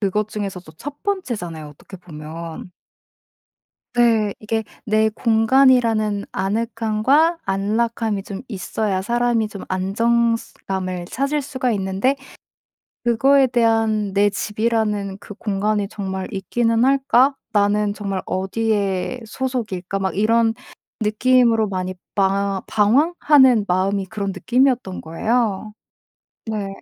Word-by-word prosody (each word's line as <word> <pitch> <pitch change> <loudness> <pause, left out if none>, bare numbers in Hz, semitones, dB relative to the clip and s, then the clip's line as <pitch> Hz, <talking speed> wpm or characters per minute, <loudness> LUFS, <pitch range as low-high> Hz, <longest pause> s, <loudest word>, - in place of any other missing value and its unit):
그것 210 +1 0
중에서도 195 -6 -5
1 285 - -9
번째잖아요, 205 - -3
어떻게 150 +6 -13
보면. 165 +1 -9 1.2
네. 225 -4 +3
이게 220 +1 -2 0.2
내 220 0 +3
공간이라는 225 -2 +3
아늑함과 230 - +1
안락함이 215 +1 -1
좀 195 -1 -7
있어야 200 -1 -2
사람이 235 0 +1
좀 200 -2 -8
안정성 230 +5 +1 0.3
감을 185 -2 -3
찾을 280 +3 -1
수가 260 -2 -2
있는데 195 +6 0 0.9
그거에 265 +4 +4
대한 225 -4 +1
'내 205 +1 +3
집이라는 210 -1 -1
그 205 - -11
공간이 205 0 -1
정말 190 -3 -4
있기는 230 +4 +1
할까? 270 0 +3 0.2
나는 205 0 +2
정말 200 -2 -3
어디의 200 +3 -1
소속일까?' 215 -7 -3
막 190 -1 -2
이런 225 +2 +3 0.5
느낌으로 225 +1 +3
많이 185 -1 -3 0.2
방황 195 0 +1
방황하는 260 0 +4
마음이 190 +2 +1
그런 200 -1 -3
느낌이었던 245 +1 +1
거예요. 215 +4 -1 0.7
네. 210 -3 -3
215 Hz, 255 characters per minute, -21 LUFS, 195-235 Hz, 1.2 s, 그거에